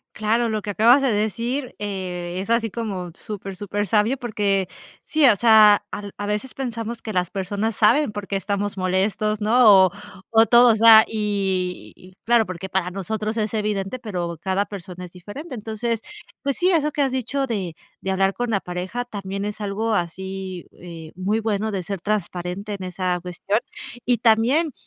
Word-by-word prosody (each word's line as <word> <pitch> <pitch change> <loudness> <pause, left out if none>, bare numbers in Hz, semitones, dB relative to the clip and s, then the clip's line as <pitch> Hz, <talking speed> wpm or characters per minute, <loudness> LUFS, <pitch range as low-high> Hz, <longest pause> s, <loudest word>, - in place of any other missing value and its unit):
Claro, 225 +2 +1
lo 215 -1 -1
que 205 - -4
acabas 235 +7 +5
de 270 - +2
decir 235 +5 -2
eh, 180 -4 -4
es 195 +3 -5
así 230 -1 +2
como 195 -5 -4
súper 195 -3 -7
súper 205 +1 -3
sabio, 220 +7 +2
porque 200 -5 0 0.4
sí, 310 -2 +2
o 215 - +5
sea, 215 -2 +6
al 205 -1 -6
a 205 - -4
veces 210 +5 -3
pensamos 235 -3 -5
que 215 - -5
las 180 -2 0
personas 205 +3 -2
saben 230 +4 +4
por 205 -1 -6
qué 200 - -3
estamos 200 +1 -2
molestos, 195 +3 0
¿no? 215 -3 +6
O 185 - -1 0.4
o 225 0 +6
todo, 240 -1 +7
o - - 0
sea, 220 0 +8
y 190 -3 -3
claro, 235 -1 +4
porque 185 0 -6
para 185 -1 -1
nosotros 215 +4 -3
es 215 0 -1
evidente, 210 +2 -2
pero 175 -7 -4
cada 190 +1 0
persona 180 -3 -8
es 175 - -13
diferente. 250 - -9
Entonces, 225 +1 -3 0.4
pues 280 -1 -1
sí, 365 +1 +3
eso 305 -3 +2
que 290 - -1
has 265 -2 -1
dicho 265 +2 -1
de 190 -8 -3 0.3
de 190 - -2
hablar 195 +1 +2
con 245 +2 -3
la 205 - +1
pareja 185 +7 -4
también 200 -3 -5
es 210 +1 -5
algo 215 +2 -1
así, 190 0 -4
eh, 165 -3 -11
muy 195 +4 0
bueno 215 -1 -1
de 190 -3 -3
ser 195 0 -5
transparente 195 0 -3
en 195 -2 -6
esa 180 0 -2
cuestión. 180 +4 -1 0.5
Y 245 -1 +2
también 245 +8 +3
205 Hz, 180 wpm, -22 LUFS, 190-225 Hz, 0.5 s, sea